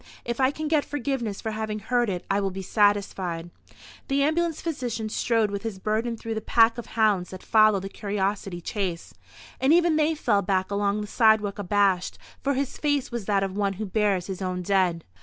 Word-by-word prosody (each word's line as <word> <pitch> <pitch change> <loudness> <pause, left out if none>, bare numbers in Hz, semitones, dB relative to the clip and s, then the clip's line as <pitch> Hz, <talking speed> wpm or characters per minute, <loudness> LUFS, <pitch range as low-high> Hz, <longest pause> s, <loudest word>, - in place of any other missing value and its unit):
"If 235 +1 -3
I 260 0 +4
can 310 +2 -4
get 300 -2 +2
forgiveness 255 -7 -3
for 220 - -3
having 215 -1 -3
heard 240 +2 0
it 180 -2 -4
I 200 - +1
will 195 - 0
be 190 +1 -6
satisfied." 190 -5 0 0.6
The 275 +1 +2
ambulance 325 +2 0
physician 245 -9 -3
strode 225 -1 +1
with 200 -1 -3
his 225 -4 -5
burden 220 +4 -1
through 225 0 -5
the 220 - -3
pack 230 +1 +4
of 240 - -7
hounds 205 -5 +2
that 185 - -9
follow 215 -2 +4
the 195 - -6
curiosity 195 -2 -3
chase, 180 -2 -4 0.5
and 265 +2 +3
even 335 -1 +4
they 315 +1 +2
fell 215 -9 +2
back 190 0 0
along 200 +1 0
the - - -4
sidewalk 215 -2 +3
abashed, 195 -2 +1 0.2
for 280 +1 0
his 275 0 -3
face 290 -4 0
was 235 -4 -4
that 200 -1 +1
of 195 -1 -3
one 200 -1 0
who 215 +3 -5
bears 200 -3 +1
his 190 -1 -6
own 180 -1 -2
dead. 180 -3 +1
210 Hz, 200 wpm, -25 LUFS, 195-240 Hz, 0.6 s, I